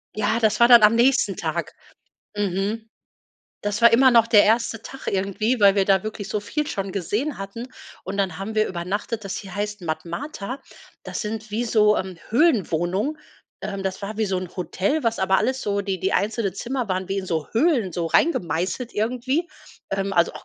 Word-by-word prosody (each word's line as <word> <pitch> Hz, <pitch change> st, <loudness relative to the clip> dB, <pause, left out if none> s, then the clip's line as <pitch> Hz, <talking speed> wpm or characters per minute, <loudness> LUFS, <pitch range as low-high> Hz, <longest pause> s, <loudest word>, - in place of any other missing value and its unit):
Ja, 215 Hz, +2 st, +1 dB
das 220 Hz, -1 st, +2 dB
war 235 Hz, -, +7 dB
dann 240 Hz, -2 st, +8 dB
am 210 Hz, +2 st, +6 dB
nächsten 255 Hz, +3 st, +3 dB
Tag -, -, -3 dB, 0.6 s
Mhm. 205 Hz, +3 st, -2 dB, 0.7 s
Das 205 Hz, 0 st, -2 dB
war 235 Hz, 0 st, +7 dB
immer 260 Hz, +2 st, +6 dB
noch 230 Hz, -2 st, +5 dB
der 220 Hz, -3 st, +6 dB
1. 225 Hz, 0 st, +1 dB
Tag 270 Hz, -, -10 dB
irgendwie, 200 Hz, +5 st, 0 dB
weil 200 Hz, -2 st, +6 dB
wir 195 Hz, -1 st, +2 dB
da 195 Hz, -1 st, +3 dB
wirklich 210 Hz, -2 st, -5 dB
so 210 Hz, -, -1 dB
viel 295 Hz, +9 st, -3 dB
schon 195 Hz, -10 st, -4 dB
gesehen 210 Hz, -, -2 dB
hatten. 195 Hz, +5 st, -6 dB, 0.4 s
Und 195 Hz, +2 st, -5 dB
dann 190 Hz, -5 st, 0 dB
haben 200 Hz, +3 st, -5 dB
wir 215 Hz, 0 st, +2 dB
übernachtet, 200 Hz, +5 st, -4 dB
das 195 Hz, -, -4 dB
hie 195 Hz, -, -9 dB
heißt 205 Hz, +2 st, -4 dB
Matmata. 185 Hz, -, -5 dB, 0.4 s
Das -, -, -4 dB
sind 215 Hz, 0 st, -5 dB
wie 225 Hz, +3 st, -1 dB
so, 215 Hz, -2 st, +4 dB
ähm, 185 Hz, -2 st, -4 dB
Höhlenwohnungen, 215 Hz, -, +1 dB, 0.4 s
ähm, 200 Hz, -2 st, -4 dB
das 190 Hz, +1 st, -4 dB
war 205 Hz, +2 st, -5 dB
wie 220 Hz, -, +1 dB
so 190 Hz, -1 st, -1 dB
'n 180 Hz, -1 st, -7 dB
Hotel, 195 Hz, -, -1 dB
was 230 Hz, -1 st, 0 dB
aber 190 Hz, 0 st, +3 dB
alles 260 Hz, 0 st, 0 dB
so 200 Hz, 0 st, 0 dB
die 195 Hz, -2 st, -3 dB
die 190 Hz, -, -1 dB
einzelnen 210 Hz, -2 st, 0 dB
Zimmer 245 Hz, +2 st, -3 dB
waren 185 Hz, 0 st, -2 dB
wie 195 Hz, 0 st, -1 dB
in 190 Hz, -, -5 dB
so 160 Hz, -4 st, -2 dB
Höhlen 235 Hz, -, +2 dB
so 170 Hz, 0 st, -2 dB
reingemeißelt, 185 Hz, -, 0 dB
irgendwie, 255 Hz, +9 st, -1 dB, 0.4 s
ähm, 195 Hz, 0 st, -1 dB
also 170 Hz, -2 st, +3 dB
auch -, -, -10 dB
205 Hz, 195 wpm, -23 LUFS, 190-230 Hz, 0.7 s, dann